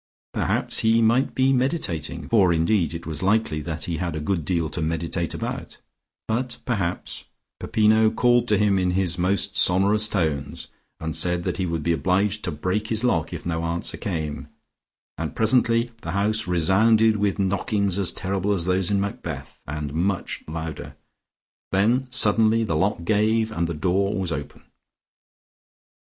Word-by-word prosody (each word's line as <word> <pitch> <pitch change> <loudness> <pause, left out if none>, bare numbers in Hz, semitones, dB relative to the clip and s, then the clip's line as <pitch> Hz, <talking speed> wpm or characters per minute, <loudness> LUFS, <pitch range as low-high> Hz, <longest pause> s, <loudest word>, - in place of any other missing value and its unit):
Perhaps - - 0
he 115 +1 +3
might 115 +4 +2
be 130 +1 +3
meditating 130 - -1
(for 100 -6 +4
indeed 85 +1 +1
it 85 - -7
was 80 -2 -4
likely 95 -6 +1
that 80 0 -5
he 85 -2 -3
had 85 -2 -3
a - - -3
good 85 +2 -1
deal 85 0 0
to 80 +2 -4
meditate 85 +1 -2
about), - - -5 0.5
but 120 +2 -2
perhaps 95 -7 -3 0.3
Peppino 110 0 +3
called 120 +1 +2
to 105 - +4
him 100 -1 +2
in 90 -1 +1
his 90 -2 0
most 95 +3 0
sonorous 100 +4 +3
tones, 80 -9 -2 0.3
and 80 -1 -4
said 90 +1 +1
that - - -2
he 95 -2 -1
would 85 -2 -2
be 85 - +2
obliged 95 +5 0
to 90 - -2
break 90 +8 -2
his 110 0 -1
lock 100 -11 +1
if - - -7
no 85 -1 -2
answer 85 +1 -2
came, 80 - -4 0.7
and - - -4
presently 115 +1 +2
the 80 - -5
house 105 +2 0
resounded 105 +6 +3
with 100 -1 0
knockings 100 0 0
as 90 -3 +1
terrible 95 +2 -1
as 85 -4 -1
those 90 0 +1
in 100 -1 +1
Macbeth, 100 0 -5
and 75 0 -4
much 90 +3 -2
louder. 80 0 -6 0.8
Then 115 +7 +2
suddenly 115 -2 +4
the 100 -8 -1
lock 95 +1 0
gave, 110 +3 +1
and 85 -5 -1
the 85 - -4
door 95 +5 0
was 95 -3 -2
open. 75 -2 -6
95 Hz, 165 wpm, -24 LUFS, 85-110 Hz, 0.8 s, for